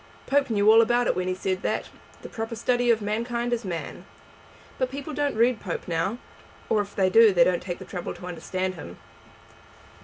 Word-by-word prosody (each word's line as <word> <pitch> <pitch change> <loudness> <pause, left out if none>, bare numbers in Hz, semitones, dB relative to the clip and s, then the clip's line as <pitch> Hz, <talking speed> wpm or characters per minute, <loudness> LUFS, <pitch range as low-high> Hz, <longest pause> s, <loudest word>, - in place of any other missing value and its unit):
Pope 280 -1 +2
knew 210 -1 +4
all 225 +1 +8
about 240 +1 +2
it - - +1
when 185 0 -2
he 185 - -1
said 185 0 -2
that - - -2 0.3
'The - - -8
proper 225 +1 -5
study 245 +1 +1
of 225 -2 +3
mankind 235 +3 -2
is 235 0 -2
man.' 170 -4 -5 0.8
But 255 -1 +1
people 280 +3 -6
don't 290 -4 -1
read 235 0 +3
Pope 180 -4 -5
now, 175 +6 -1 0.5
or 215 - +3
if 205 0 -8
they 190 -1 +2
do 225 +1 +7
they 175 -3 +5
don't 180 0 +1
take 175 -2 -5
the - - -10
trouble 180 -3 -5
to - - -10
understand 185 +1 -3
him." 90 - -10
215 Hz, 205 wpm, -25 LUFS, 185-240 Hz, 0.8 s, all